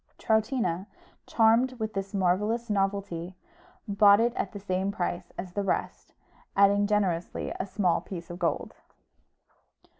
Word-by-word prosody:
Troutina, 220 Hz, -5 st, 0 dB, 0.4 s
charmed 230 Hz, +3 st, +3 dB
with 220 Hz, -3 st, -4 dB
this 195 Hz, 0 st, -4 dB
marvellous 210 Hz, +4 st, 0 dB
novelty, 195 Hz, -3 st, -2 dB, 0.5 s
bought 200 Hz, 0 st, +6 dB
it 235 Hz, +1 st, +2 dB
at 195 Hz, -, -3 dB
the 205 Hz, -, -7 dB
same 190 Hz, 0 st, -1 dB
price 175 Hz, -3 st, -3 dB
as 175 Hz, 0 st, -6 dB
the 205 Hz, -, -1 dB
rest, 195 Hz, -, -3 dB, 0.4 s
adding 200 Hz, +1 st, +4 dB
generously 190 Hz, -5 st, -1 dB
a 190 Hz, -, -2 dB
small 185 Hz, -4 st, +1 dB
piece 175 Hz, -2 st, -8 dB
of 175 Hz, -, -8 dB
gold. 170 Hz, -, -1 dB
200 Hz, 130 wpm, -28 LUFS, 185-215 Hz, 0.5 s, bought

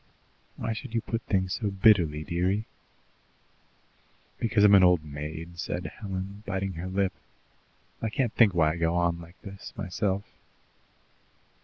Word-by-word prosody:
"Why 115 Hz, -, -2 dB
should 110 Hz, +1 st, -7 dB
you 115 Hz, -, +2 dB
put 115 Hz, +1 st, -3 dB
things 95 Hz, -2 st, +1 dB
so 105 Hz, -4 st, -1 dB
bitterly, 95 Hz, -7 st, +4 dB
dearie?" 90 Hz, +6 st, 0 dB, 1.7 s
"Because 110 Hz, -2 st, +2 dB
I'm 105 Hz, -1 st, +7 dB
an 95 Hz, -2 st, +8 dB
old 90 Hz, -3 st, +5 dB
maid," 80 Hz, +4 st, -7 dB
said 90 Hz, 0 st, -3 dB
Helen, 100 Hz, 0 st, -5 dB
biting 95 Hz, -2 st, -2 dB
her 85 Hz, +2 st, -5 dB
lip. 95 Hz, 0 st, 0 dB, 0.9 s
"I 115 Hz, -, -1 dB
can't 120 Hz, 0 st, 0 dB
think 105 Hz, -6 st, +5 dB
why 80 Hz, -2 st, +4 dB
I 80 Hz, -, -4 dB
go 85 Hz, 0 st, +1 dB
on 85 Hz, -1 st, +1 dB
like 85 Hz, +2 st, -14 dB
this 100 Hz, 0 st, -9 dB
myself." 100 Hz, 0 st, -1 dB
95 Hz, 145 wpm, -28 LUFS, 85-105 Hz, 1.7 s, an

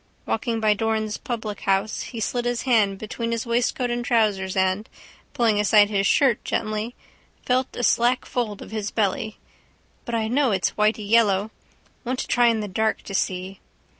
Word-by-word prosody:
Walking 230 Hz, 0 st, -1 dB
by 215 Hz, -1 st, +3 dB
Doran's 220 Hz, 0 st, -1 dB
publichouse 210 Hz, -3 st, -2 dB
he 235 Hz, -, -7 dB
slid 240 Hz, +2 st, -2 dB
his 245 Hz, -1 st, -1 dB
hand 215 Hz, -6 st, +2 dB
between 230 Hz, +3 st, -4 dB
his 230 Hz, 0 st, -2 dB
waistcoat 245 Hz, +1 st, 0 dB
and 240 Hz, 0 st, -2 dB
trousers 210 Hz, -6 st, +1 dB
and, 190 Hz, +3 st, 0 dB, 0.5 s
pulling 225 Hz, -3 st, +2 dB
aside 210 Hz, 0 st, +5 dB
his 200 Hz, -1 st, +2 dB
shirt 260 Hz, -6 st, +3 dB
gently, 215 Hz, +3 st, -2 dB, 0.5 s
felt 255 Hz, +1 st, 0 dB
a 245 Hz, -, -3 dB
slack 240 Hz, +2 st, +2 dB
fold 220 Hz, -5 st, -3 dB
of -, -, -13 dB
his 215 Hz, -2 st, -3 dB
belly. 215 Hz, 0 st, -1 dB, 0.7 s
But 235 Hz, -, -3 dB
I 220 Hz, -1 st, 0 dB
know 265 Hz, +3 st, +2 dB
it's 190 Hz, -4 st, +1 dB
whitey 215 Hz, 0 st, 0 dB
yellow. 210 Hz, -2 st, +3 dB, 0.5 s
Want 255 Hz, 0 st, -2 dB
to -, -, -3 dB
try 245 Hz, -1 st, +4 dB
in 225 Hz, -2 st, +2 dB
the 210 Hz, -, -4 dB
dark 220 Hz, +3 st, -1 dB
to 200 Hz, -, -8 dB
see. 185 Hz, 0 st, -2 dB
220 Hz, 170 wpm, -24 LUFS, 205-235 Hz, 0.7 s, aside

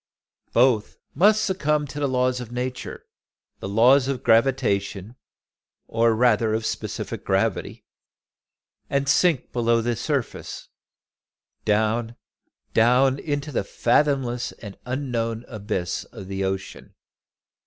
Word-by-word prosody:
Both 120 Hz, -3 st, +2 dB, 0.2 s
must 210 Hz, +7 st, +4 dB
succumb 150 Hz, -6 st, 0 dB
to 140 Hz, +1 st, -7 dB
the 145 Hz, -, +1 dB
laws 125 Hz, -1 st, +1 dB
of 120 Hz, -1 st, -8 dB
Nature, 125 Hz, +1 st, -5 dB, 0.5 s
the 95 Hz, -, -5 dB
laws 125 Hz, +6 st, +5 dB
of 135 Hz, -3 st, -3 dB
gravitation, 115 Hz, -3 st, +1 dB, 0.7 s
or 115 Hz, 0 st, +2 dB
rather 110 Hz, -2 st, +3 dB
of 110 Hz, 0 st, -3 dB
specific -, -, -4 dB
gravity, -, -, -1 dB, 1.0 s
and 140 Hz, 0 st, 0 dB
sink 160 Hz, 0 st, +2 dB
below 115 Hz, -1 st, +2 dB
the 120 Hz, +1 st, -1 dB
surface, -, -, -4 dB, 1.0 s
down, 110 Hz, +2 st, +1 dB, 0.6 s
down 130 Hz, +4 st, +4 dB
into 145 Hz, 0 st, -3 dB
the 120 Hz, -, -1 dB
fathomless 120 Hz, +2 st, 0 dB
and 100 Hz, -3 st, -10 dB
unknown 120 Hz, -3 st, -2 dB
abysm 100 Hz, -6 st, -4 dB
of 95 Hz, -, -10 dB
the 95 Hz, 0 st, -2 dB
ocean. 95 Hz, 0 st, -5 dB
120 Hz, 110 wpm, -24 LUFS, 110-135 Hz, 1.0 s, laws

